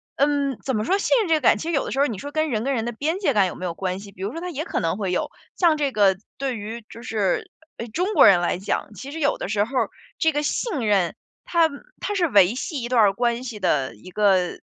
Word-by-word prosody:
嗯， 280 Hz, -2 st, +1 dB
怎 265 Hz, -, -1 dB
么 215 Hz, -, 0 dB
说， 385 Hz, -, +2 dB
信 -, -, +3 dB
任 415 Hz, -, -1 dB
这 325 Hz, -, +3 dB
个 310 Hz, -, -1 dB
感， 235 Hz, -, +5 dB
其 315 Hz, -, -6 dB
实 -, -, -1 dB
有 280 Hz, -, +2 dB
的 -, -, -5 dB
时 270 Hz, -, -2 dB
候 280 Hz, -, +5 dB
你 230 Hz, -8 st, -3 dB
说 285 Hz, -, -7 dB
跟 310 Hz, +1 st, 0 dB
人 220 Hz, -2 st, -1 dB
跟 275 Hz, +2 st, 0 dB
人 225 Hz, -2 st, -1 dB
的 240 Hz, -, -2 dB
边 300 Hz, +9 st, -2 dB
界 395 Hz, -, +1 dB
感 200 Hz, -3 st, +4 dB
有 -, -, -6 dB
没 185 Hz, -, -6 dB
有 175 Hz, -, -2 dB
关 185 Hz, +1 st, -3 dB
系？ 200 Hz, 0 st, -11 dB
比 185 Hz, -, -14 dB
如 200 Hz, +3 st, -2 dB
说 330 Hz, -, -6 dB
他 360 Hz, +1 st, -5 dB
也 310 Hz, 0 st, -4 dB
可 -, -, -2 dB
能 165 Hz, +2 st, -1 dB
会 195 Hz, -4 st, -2 dB
有， 180 Hz, -, -1 dB, 0.3 s
像 335 Hz, -4 st, +3 dB
这 285 Hz, -2 st, 0 dB
个 200 Hz, -4 st, +4 dB, 0.2 s
对 265 Hz, -3 st, -2 dB
于， 220 Hz, +2 st, -7 dB
就 230 Hz, -, -10 dB
是， 210 Hz, -5 st, -1 dB, 0.3 s
哎， 230 Hz, -, -5 dB
中 360 Hz, -, -1 dB
国 -, -, +7 dB
人 190 Hz, -3 st, +7 dB
来 175 Hz, 0 st, -1 dB
讲， 200 Hz, +2 st, -3 dB
其 265 Hz, +8 st, -8 dB
实 320 Hz, -, -6 dB
有 285 Hz, -2 st, +1 dB
的 -, -, -4 dB
时 205 Hz, -1 st, +2 dB
候 245 Hz, +6 st, -7 dB
儿， 225 Hz, -, 0 dB, 0.3 s
这 320 Hz, -, +3 dB
个 295 Hz, 0 st, -1 dB
信 300 Hz, -, -1 dB
任， 195 Hz, -5 st, +2 dB, 0.3 s
它 335 Hz, -2 st, +3 dB, 0.3 s
它 415 Hz, -, -3 dB
是 365 Hz, -4 st, +2 dB
维 200 Hz, -, +5 dB
系 265 Hz, +1 st, -4 dB
一 -, -, -2 dB
段 245 Hz, -2 st, +4 dB
儿 200 Hz, -2 st, +5 dB
关 235 Hz, +2 st, 0 dB
系 235 Hz, -5 st, -6 dB
的 140 Hz, -, 0 dB
一 110 Hz, -, -13 dB
个 190 Hz, -3 st, +2 dB
235 Hz, 310 characters per minute, -23 LUFS, 200-290 Hz, 0.3 s, 国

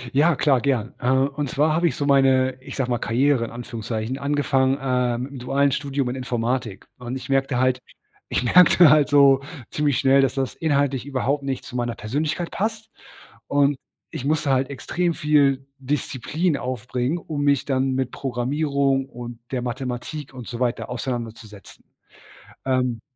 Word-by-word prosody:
Ja, 160 Hz, +3 st, +4 dB
klar, 135 Hz, -3 st, +2 dB
gern. 125 Hz, -5 st, 0 dB
Äh, 125 Hz, -, 0 dB
und 140 Hz, +2 st, +1 dB
zwar 155 Hz, +4 st, +2 dB
habe 170 Hz, +2 st, +2 dB
ich -, -, -2 dB
so 145 Hz, -, -2 dB
meine, 135 Hz, -2 st, +3 dB
ich 135 Hz, 0 st, -9 dB
sage 130 Hz, -3 st, -1 dB
mal 120 Hz, -, 0 dB
Karriere 130 Hz, +2 st, +2 dB
in -, -, -8 dB
Anführungszeichen, 115 Hz, +1 st, -5 dB
angefangen, 140 Hz, -2 st, +1 dB
äh, 125 Hz, -3 st, 0 dB
mit 130 Hz, +3 st, -5 dB
‘nem 135 Hz, -, -8 dB
dualen 140 Hz, +3 st, +1 dB
Studium 140 Hz, -1 st, -2 dB
in 125 Hz, -, -3 dB
Informatik. 125 Hz, -3 st, -2 dB
Und, 125 Hz, +1 st, -5 dB
ich 130 Hz, -, -7 dB
merkte 135 Hz, -1 st, +1 dB
halt 130 Hz, 0 st, +2 dB, 0.5 s
ich -, -, 0 dB
merkte 170 Hz, +3 st, +6 dB
halt 150 Hz, -1 st, +4 dB
so 140 Hz, -2 st, +6 dB, 0.3 s
ziemlich 145 Hz, -4 st, +1 dB
schnell, 135 Hz, 0 st, +4 dB
dass 135 Hz, -1 st, +1 dB
das 135 Hz, -2 st, -1 dB
inhaltlich 140 Hz, -4 st, 0 dB
überhaupt 140 Hz, +1 st, -1 dB
nicht 135 Hz, -2 st, -3 dB
zu -, -, -9 dB
meiner 120 Hz, -1 st, -2 dB
Persönlichkeit 155 Hz, +9 st, -2 dB
passt 220 Hz, +1 st, -3 dB, 0.6 s
und 145 Hz, 0 st, +2 dB, 0.3 s
ich 125 Hz, -, -6 dB
musste 150 Hz, -1 st, +1 dB
halt 130 Hz, 0 st, +1 dB
extrem 170 Hz, +6 st, -1 dB
viel 140 Hz, -4 st, +2 dB
Disziplin 145 Hz, +4 st, -1 dB
aufbringen, 125 Hz, +4 st, -2 dB
um 155 Hz, -3 st, -4 dB
mich 140 Hz, -2 st, +2 dB
dann 135 Hz, -1 st, 0 dB
mit 130 Hz, -1 st, -1 dB
Programmierung 135 Hz, +1 st, 0 dB
und 120 Hz, -1 st, -8 dB
der 130 Hz, -, -1 dB
Mathematik 130 Hz, +3 st, -5 dB
und 125 Hz, -3 st, -8 dB
so 120 Hz, 0 st, -6 dB
weiter 125 Hz, -1 st, -1 dB
auseinanderzusetzen. 115 Hz, -4 st, -6 dB, 0.8 s
Ähm 125 Hz, -3 st, 0 dB
135 Hz, 165 wpm, -23 LUFS, 125-145 Hz, 0.8 s, merkte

